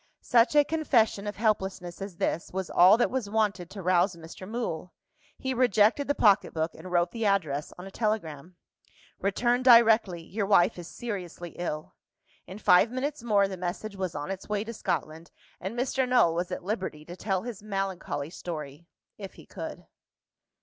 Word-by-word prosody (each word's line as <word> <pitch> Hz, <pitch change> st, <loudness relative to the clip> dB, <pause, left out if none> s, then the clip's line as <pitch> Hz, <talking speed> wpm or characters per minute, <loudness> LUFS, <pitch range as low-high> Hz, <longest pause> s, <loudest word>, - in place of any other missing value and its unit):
Such 240 Hz, +4 st, +3 dB
a 295 Hz, -, +7 dB
confession 240 Hz, -10 st, +1 dB
of 205 Hz, -, -4 dB
helplessness 190 Hz, -5 st, -1 dB
as 195 Hz, -3 st, -7 dB
this, 170 Hz, -, -2 dB
was 190 Hz, -1 st, -4 dB
all 185 Hz, +5 st, +7 dB
that 240 Hz, -, +1 dB
was 250 Hz, -6 st, -2 dB
wanted 205 Hz, -5 st, 0 dB
to 195 Hz, -1 st, -8 dB
rouse 180 Hz, +1 st, +2 dB
Mr. 170 Hz, +3 st, -10 dB
Mool. 200 Hz, -7 st, -4 dB, 0.4 s
He 260 Hz, 0 st, -2 dB
rejected 245 Hz, +2 st, +3 dB
the 285 Hz, -, +1 dB
pocket 205 Hz, -4 st, +3 dB
book, 160 Hz, +1 st, -1 dB
and 185 Hz, -, -10 dB
wrote 175 Hz, 0 st, +2 dB
the 230 Hz, -1 st, -4 dB
address 160 Hz, -9 st, 0 dB
on 180 Hz, -, -9 dB
a 195 Hz, -, -9 dB
telegram. 180 Hz, -7 st, -3 dB, 0.6 s
"Return 240 Hz, +5 st, +1 dB
directly: 225 Hz, -8 st, +5 dB
your 200 Hz, +4 st, -3 dB
wife 180 Hz, -3 st, +4 dB
is 170 Hz, -, -8 dB
seriously 180 Hz, -7 st, -6 dB
ill." 155 Hz, -3 st, -5 dB, 0.5 s
In 185 Hz, +3 st, -8 dB
five 200 Hz, +1 st, +5 dB
minutes 275 Hz, +4 st, -3 dB
more, 205 Hz, -4 st, +3 dB
the 190 Hz, -1 st, -6 dB
message 185 Hz, +4 st, -4 dB
was 185 Hz, -3 st, -4 dB
on 145 Hz, +5 st, -4 dB
its 195 Hz, +1 st, -7 dB
way 210 Hz, -1 st, 0 dB
to 230 Hz, +1 st, -7 dB
Scotland; 160 Hz, -5 st, -3 dB, 0.3 s
and 195 Hz, +6 st, -5 dB
Mr. 255 Hz, +1 st, 0 dB
Null 245 Hz, -10 st, +4 dB
was 175 Hz, +2 st, -2 dB
at 180 Hz, -, -4 dB
liberty 185 Hz, -6 st, -4 dB
to 175 Hz, -, -9 dB
tell 190 Hz, -1 st, -2 dB
his 235 Hz, -4 st, -7 dB
melancholy 195 Hz, -7 st, -3 dB
story 155 Hz, -2 st, -7 dB, 0.3 s
if 195 Hz, -2 st, -8 dB
he -, -, -14 dB
could. -, -, -8 dB
195 Hz, 175 wpm, -28 LUFS, 175-225 Hz, 0.6 s, a